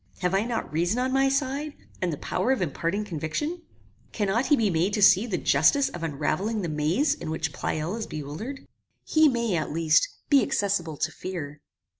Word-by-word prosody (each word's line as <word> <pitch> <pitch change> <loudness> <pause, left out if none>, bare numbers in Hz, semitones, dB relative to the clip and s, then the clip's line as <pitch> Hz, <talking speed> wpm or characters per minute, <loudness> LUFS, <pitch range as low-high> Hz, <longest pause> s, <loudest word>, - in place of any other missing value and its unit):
Have 180 0 0
I 195 +2 +2
not 235 -9 -3
reason 175 +8 +1
on 255 +1 0
my 270 0 +3
side, 275 +2 -1 0.3
and 180 -2 0
the 150 - -4
power 255 - -1
of 265 - +1
imparting 175 +4 -2
conviction? 210 - -3 0.5
Cannot 215 +4 0
he 295 - +5
be 220 -6 +1
made 175 +5 +1
to 210 - 0
see 195 +4 +6
the 190 -6 -1
justice 160 - +3
of 175 - -8
unravelling 165 +8 -1
the 170 - -2
maze 155 - +1
in - - -7
which 160 -1 -2
Pleyel 160 +7 -2
is 225 -1 -4
bewildered? 155 - -6 0.4
He 315 0 +5
may, 235 -6 0
at 155 - -2
least, 165 - +3 0.2
be 280 -2 +5
accessible 175 -7 -1
to - - -1
fear. 155 -6 -6
195 Hz, 190 wpm, -26 LUFS, 160-245 Hz, 0.5 s, see